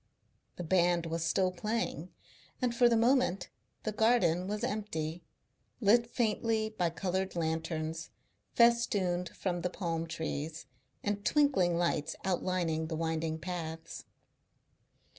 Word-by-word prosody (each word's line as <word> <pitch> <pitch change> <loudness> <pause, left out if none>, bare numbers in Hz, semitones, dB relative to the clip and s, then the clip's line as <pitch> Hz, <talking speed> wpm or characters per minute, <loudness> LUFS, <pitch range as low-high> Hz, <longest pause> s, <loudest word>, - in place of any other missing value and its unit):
The 175 - -5
band 175 0 +2
was 165 0 -2
still 185 +2 +2
playing, 185 -3 -2 0.5
and 250 -2 0
for 240 0 +5
the 230 - +3
moment 235 -6 +2 0.3
the 215 - -1
garden 215 -6 +3
was 210 +2 -3
empty, 180 -8 -3 0.6
lit 235 +2 +4
faintly 225 -2 0
by 180 -6 0
coloured 190 +2 -2
lanterns, 160 0 -2 0.5
festooned 200 -7 +3
from 175 -1 -3
the 180 - -1
palm 165 -3 -3
trees, 160 -1 -4 0.4
and 205 0 -1
twinkling 205 - +3
lights 170 -3 0
outlining 175 -4 0
the 160 - -3
winding 160 0 -1
paths. 165 -2 -6
180 Hz, 120 wpm, -32 LUFS, 165-215 Hz, 0.6 s, for